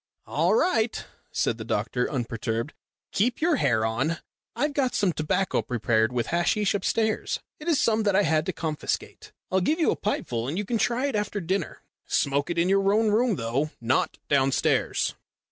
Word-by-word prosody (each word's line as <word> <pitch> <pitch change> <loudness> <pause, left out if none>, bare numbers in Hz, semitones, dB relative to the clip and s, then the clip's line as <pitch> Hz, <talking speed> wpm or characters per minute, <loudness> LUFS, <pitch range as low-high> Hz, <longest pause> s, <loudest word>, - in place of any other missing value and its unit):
"All - - +2
right," 245 - +1 0.3
said 115 - 0
the - - -4
doctor, 115 +3 -1
unperturbed. 115 0 -2 0.4
"Keep 240 +5 +1
your 320 -1 +2
hair 110 - +2
on. 135 +9 0 0.4
I've 295 0 0
got 270 -3 0
some 195 -4 +2
tobacco 180 +5 0
prepared 115 -1 +1
with 120 -3 -2
hasheesh 175 +4 +2
upstairs. 220 +2 0 0.2
It 305 - -9
is 325 -5 +3
some 220 -1 +2
that 205 -3 +2
I 205 - +4
had 160 -2 +1
to - - +1
confiscate. 160 -3 -4 0.2
I'll 190 0 +2
give 310 - +1
you 325 - +3
a - - 0
pipeful 120 - -2
and 150 +6 -3
you 205 - -1
can 230 +2 -1
try 245 +4 +1
it 275 -5 -1
after 210 0 -1
dinner. 190 +2 -3 0.2
Smoke 140 +2 +1
it 170 - -2
in 170 +1 +3
your 195 +1 +3
own 215 +1 +3
room, 225 0 +2
though 125 +4 -1
not 120 +2 0
downstairs." 135 -2 +2
180 Hz, 180 wpm, -26 LUFS, 130-220 Hz, 0.4 s, I